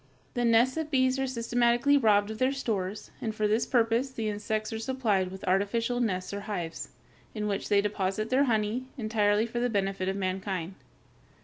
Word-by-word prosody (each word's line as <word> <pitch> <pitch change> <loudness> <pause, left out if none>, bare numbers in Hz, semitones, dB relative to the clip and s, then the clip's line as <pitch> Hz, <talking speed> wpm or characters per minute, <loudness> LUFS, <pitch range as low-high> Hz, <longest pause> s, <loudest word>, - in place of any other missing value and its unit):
The 245 -2 0
nests 235 +4 +4
of 320 -1 -2
bees 260 -2 +2
are 270 - 0
systematically 240 +2 +2
robbed 210 -5 +3
of 220 - -7
their 260 +1 +3
stores, 210 -7 -3
and 220 -2 -3
for 215 -1 +1
this 220 +3 +1
purpose 235 +2 +2
the 225 -4 -3
insects 215 +1 -3
are 220 - -3
supplied 220 -6 0
with 190 +1 -9
artificial 230 +6 +1
nests 185 -5 -1
or 200 - -3
hives, 170 -5 -4 0.5
in 210 -1 -2
which 200 -1 -2
they 200 -1 +4
deposit 210 +1 -2
their 270 +2 +4
honey, 225 +1 0
entirely 215 -2 +2
for 235 +1 -4
the 245 +1 +1
benefit 195 -3 -1
of 190 - -2
mankind. 190 -2 -3
220 Hz, 185 wpm, -28 LUFS, 200-245 Hz, 0.5 s, nests